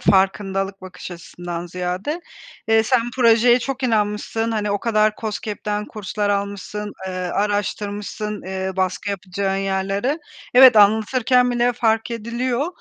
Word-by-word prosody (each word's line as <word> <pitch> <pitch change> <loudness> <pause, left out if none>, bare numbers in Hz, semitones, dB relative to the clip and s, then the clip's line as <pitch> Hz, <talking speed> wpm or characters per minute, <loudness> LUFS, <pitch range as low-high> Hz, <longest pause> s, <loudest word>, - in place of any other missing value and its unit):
farkındalık 195 0 +1
bakış 185 0 -9
açısından 175 0 -7
ziyade. 180 - -3 0.5
Eee, 225 0 +5
sen 240 0 +1
projeye 240 0 +5
çok 270 +2 -4
inanmışsın, 225 -1 0
hani, 210 -2 -1
o 205 - 0
kadar 215 -2 +2
KOSGEB'den 210 -1 -3
kurslar 210 0 -3
almışsın, 200 +1 -3
eee, 185 - -4
araştırmışsın, 205 +2 -2
eee, 190 +1 -3
baskı 185 +2 -1
yapacağın 195 0 -2
yerleri. 195 - -1 0.4
Evet, 255 -2 +9
anlatırken 235 +4 +4
bile 240 0 +2
fark 225 -1 +1
ediliyor 235 +4 -2
210 Hz, 120 wpm, -21 LUFS, 195-230 Hz, 0.5 s, Evet